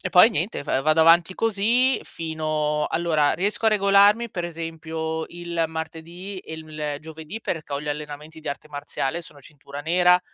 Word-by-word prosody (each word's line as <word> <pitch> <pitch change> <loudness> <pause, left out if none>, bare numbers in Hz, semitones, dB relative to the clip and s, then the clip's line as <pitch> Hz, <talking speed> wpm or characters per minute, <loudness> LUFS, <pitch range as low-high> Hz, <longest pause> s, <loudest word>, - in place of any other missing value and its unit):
e 185 - -2
poi 185 +6 +8
niente 175 -4 -1
f 135 - +1
vado 155 +2 +4
avanti 165 +3 +5
così 230 +4 +2
fino 155 -2 -1
allora, 160 -3 +2
riesco 205 +4 0
a - - +8
regolarmi, 205 +3 +5
per 175 -2 -3
esempio, 160 -1 -4
il 170 -1 -2
martedì 165 +4 -6
e 160 - -8
il 155 -2 -5
giovedì 160 +6 -8
perché 155 -7 -4
ho 140 - -2
gli 150 - -6
allenamenti 150 +2 -6
di - - -6
arte 145 +2 -5
marziale- 145 +2 -3
sono 145 -3 -13
cintura 140 0 -10
nera, 180 +3 +4
160 Hz, 170 wpm, -24 LUFS, 155-180 Hz, -, poi